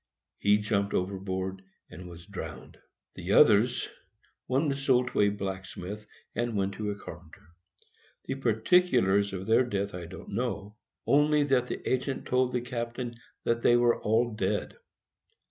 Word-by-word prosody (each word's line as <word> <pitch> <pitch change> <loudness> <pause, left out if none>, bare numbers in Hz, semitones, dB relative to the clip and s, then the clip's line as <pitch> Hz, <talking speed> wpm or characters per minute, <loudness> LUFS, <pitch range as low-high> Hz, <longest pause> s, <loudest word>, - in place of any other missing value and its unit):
He 105 0 +4
jumped 105 -1 0
over, 95 +1 -1 0.7
and 90 +2 -9
was 85 0 -11
drowned. 100 -1 -8 0.3
The - - -3
others,—one 125 +5 +2
was 140 0 -2
sold 125 -2 +3
to - - +1
a 100 - +5
blacksmith, 100 +1 -6 0.3
and 120 -2 -1
one 100 0 0
to 105 +1 -4
a 100 - -2
carpenter. 85 -5 -12 0.8
The - - -2
particulars 115 - +3
of 95 0 -5
their 115 +4 +4
death 100 -4 -2
I 90 -2 -6
didn't 95 - -10
know, 105 -4 -3 0.3
only 150 +1 +4
that 130 -3 +2
the - - -5
agent 130 +1 -1
told 125 0 +2
the 125 - -1
captain 120 0 -4 0.3
that 115 0 0
they 120 - +5
were 120 -1 +3
all 115 +3 +2
dead. 110 - -2
110 Hz, 145 wpm, -29 LUFS, 100-125 Hz, 0.8 s, a